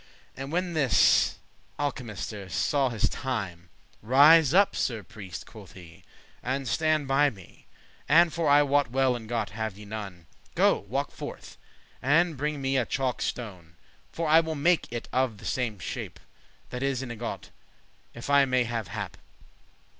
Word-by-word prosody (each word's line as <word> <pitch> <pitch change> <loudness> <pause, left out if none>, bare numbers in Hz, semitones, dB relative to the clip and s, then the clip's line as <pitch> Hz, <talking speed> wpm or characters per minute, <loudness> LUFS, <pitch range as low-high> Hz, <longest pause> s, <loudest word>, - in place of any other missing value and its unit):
And 135 +2 -6
when 180 +1 -1
this 140 -7 +4 0.4
alchemister 110 -8 -4
saw 135 - +1
his 115 -4 0
time, 95 -10 -4 0.3
"Rise 145 +5 +6
up, 195 +4 +4
Sir 115 -4 -2
Priest," 95 -4 -9
quoth - - -13
he, 85 -3 -14 0.4
"and 135 +1 -2
stand 150 +6 +1
by 140 +2 +4
me; 95 -8 -16 0.4
And, 165 +2 +5
for 165 -3 0
I 145 +1 +6
wot 145 -2 +2
well 130 0 +2
ingot* 110 -3 -3
have 110 -1 -4
ye 105 - -11
none; 100 -5 -7
*mould - - -32
Go, - - +4
walke - - -2
forth, - - -9 0.5
and 160 +5 +3
bring 145 0 -3
me 135 0 +1
a 125 - +1
chalk 130 -2 -1
stone; 90 -9 -5 0.4
For 165 -1 -3
I 160 +1 +7
will 160 -1 -2
make 170 +1 +1
it 120 -1 -5
of 130 -4 +1
the - - -13
same 120 -5 -2
shape 90 - -6 0.5
That 125 - -5
is 135 -1 -1
an 125 - -6
ingot, 120 0 -6 0.6
if 120 - -8
I 140 -1 +5
may 130 -1 +2
have 115 -3 -3
hap. 100 -3 -6
130 Hz, 160 wpm, -27 LUFS, 110-145 Hz, 0.6 s, I